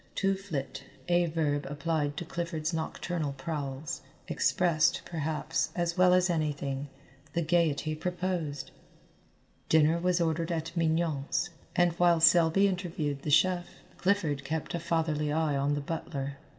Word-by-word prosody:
To 195 0 +2
flit, 155 -10 -5 0.2
a 175 0 +3
verb 150 -3 -1
applied 145 0 -1
to 175 - -3
Clifford's 170 -1 -3
nocturnal 160 -1 -2
prowls, 140 0 -4 0.3
expressed, 175 -1 +2
perhaps, 155 -2 -1
as 170 -1 0
well 180 0 +5
as 185 0 +4
anything, 145 -4 -2 0.4
the 170 - 0
gaiety 160 -2 +1
proposed. 170 -4 -3 1.0
Dinner 160 +1 +4
was 180 0 +1
ordered 165 0 0
at 165 +1 -3
Mignon's, 165 -1 0 0.2
and 175 0 +4
while 175 -1 +5
Selby 170 +3 +5
interviewed 165 -7 -2
the 150 - -4
chef, 175 +3 +3 0.3
Clifford 165 -8 +1
kept 155 +3 -3
a 170 - -1
fatherly 160 -3 0
eye 155 -1 +1
on 140 +1 +1
the 145 - -2
butler. 140 -2 -4
160 Hz, 135 wpm, -29 LUFS, 145-175 Hz, 1.0 s, well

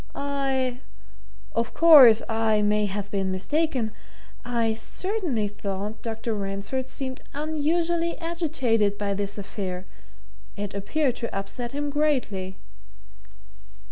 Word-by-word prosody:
"I 270 -3 -1 0.7
of 230 0 -1
course, 275 -9 +9
I 220 -1 +2
may 210 0 +2
have 205 +1 -4
been 195 -2 0
mistaken 250 - 0 0.5
I 235 -2 0
certainly 300 - -1
thought 205 +1 -5
Dr. 225 0 -3
Ransford 200 +6 -3
seemed 260 0 -4
unusually 330 +3 0
agitated 260 - 0
by 205 -1 -1
this 200 +1 -2
affair 190 -2 -5 0.7
it 205 0 -4
appeared 250 +7 0
to 235 - -4
upset 235 +5 -4
him 290 0 -2
greatly." 250 -11 0
230 Hz, 110 wpm, -25 LUFS, 205-285 Hz, 0.7 s, course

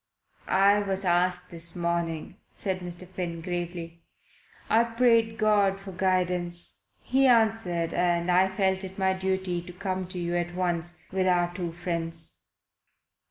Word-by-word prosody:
"I 200 +2 +4
was 195 -1 -1
asked 180 0 +1
this 170 0 -1
morning," 170 0 -2 0.2
said 190 -2 -2
Mr. 180 0 -3
Finn 175 -2 -4
gravely. 170 -1 -5 0.7
"I 225 +1 +4
prayed 230 -1 +2
God 205 -3 +3
for 195 0 -9
guidance. 180 -2 -1 0.3
He 270 +1 +3
answered, 220 -8 +2
and 175 0 +1
I 185 +2 +5
felt 190 0 0
it 190 0 -7
my 190 -1 +2
duty 190 -2 -1
to 175 - -10
come 185 0 -3
to 185 - -1
you 175 0 -2
at 175 0 -2
once, 175 -1 -1
with 185 0 +1
our 175 -1 +2
two 175 -2 -4
friends." 165 -1 -4
180 Hz, 145 wpm, -27 LUFS, 175-190 Hz, 0.7 s, I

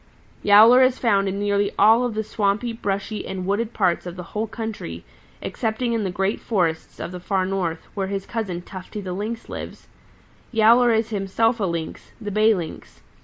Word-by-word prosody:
"Yowler 220 +5 +7
is 255 0 +4
found 200 -5 +2
in 195 - -3
nearly 205 0 +1
all 220 +4 +6
of 245 -3 -2
the 220 - -1
swampy, 210 +3 -1
brushy 200 -1 -3
and 185 -1 -4
wooded 210 +4 -1
parts 180 -5 0
of 175 - -6
the 180 - -7
whole 215 +1 -1
country, 215 - -6 0.4
excepting 235 +1 -2
in 225 -2 0
the 190 - -1
great 195 +3 -1
forests 170 -7 -1
of - - -5
the 180 - -7
Far 185 +1 0
North, 180 -4 -2
where 195 -2 -2
his 195 0 -3
cousin 190 -7 -4
Tufty 185 +3 -8
the 185 -3 -5
Lynx 220 +5 -4
lives. - - -8 0.6
Yowler 235 +2 +5
is 225 0 +1
himself 220 +4 +1
a 200 - +1
Lynx, 170 -3 -5
the 210 -2 -5
Bay 215 +2 +4
Lynx. 170 -4 -7
205 Hz, 185 wpm, -23 LUFS, 190-225 Hz, 0.6 s, Yowler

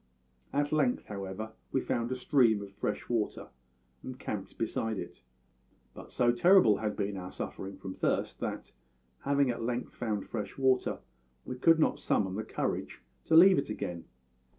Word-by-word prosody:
"At 145 +1 0
length, 145 -5 +1
however, 100 +2 -6 0.2
we 135 - +2
found 120 -1 -2
a - - 0
stream 120 -5 +3
of 100 - -10
fresh 105 +1 -3
water 115 -3 -2 0.5
and 130 -1 -7
camped 105 -6 -6
beside 110 -1 -2
it. - - -7 0.7
But - - -11
so 120 -1 +3
terrible 120 - +5
had 105 0 -2
been 100 -1 -2
our 90 0 -6
suffering 95 0 -6
from 95 -1 -7
thirst - - -1
that, - - -4 0.5
having 140 -2 +3
at 115 - -5
length 120 +1 -3
found 110 -4 -2
fresh 105 -4 -5
water, 130 -1 +2 0.4
we 125 - -5
could 165 +6 +5
not 160 - +2
summon 95 -2 0
the 110 +3 -3
courage - - -3 0.2
to 160 - +3
leave 185 +2 +8
it 140 - -4
again. 90 -5 -4
115 Hz, 165 wpm, -31 LUFS, 105-130 Hz, 0.7 s, leave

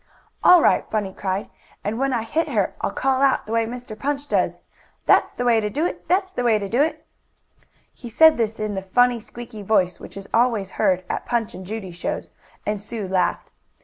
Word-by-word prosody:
"All 360 -2 +8
right," - - +3
Bunny 205 -3 -2
cried. 190 +1 -3 0.3
"And 215 +3 -2
when 270 0 +1
I 235 -3 0
hit 315 +9 -1
her - - 0
I'll - - 0
call 265 -1 0
out, 275 -1 +3
the 215 - -8
way 230 0 +1
Mr. 245 -2 -7
Punch 280 +5 -3
does: - - +1 0.5
'That's - - +4
the 245 - -3
way 235 -2 +4
to 210 -1 -1
do 295 +9 -1
it! - - -4
That's 375 +2 +1
the 345 - -3
way 235 -2 +4
I 205 -2 -1
do 240 +7 +1
it!'" 315 +2 -1 0.9
He 240 - -10
said 320 +7 +6
this 225 -1 -2
in 215 -1 -2
the 190 - -3
funny, 245 +5 +2
squeaky 225 -1 -10
voice 185 -4 +1
which - - -11
is 195 0 -8
always 225 -5 +2
heard 185 0 +1
at - - -4
Punch 235 -3 -1
and 185 0 -9
Judy 210 -3 -5
shows, 175 - -4 0.3
and 210 -1 -2
Sue 215 -1 -5
laughed. 185 -1 0
225 Hz, 215 wpm, -22 LUFS, 205-250 Hz, 0.9 s, All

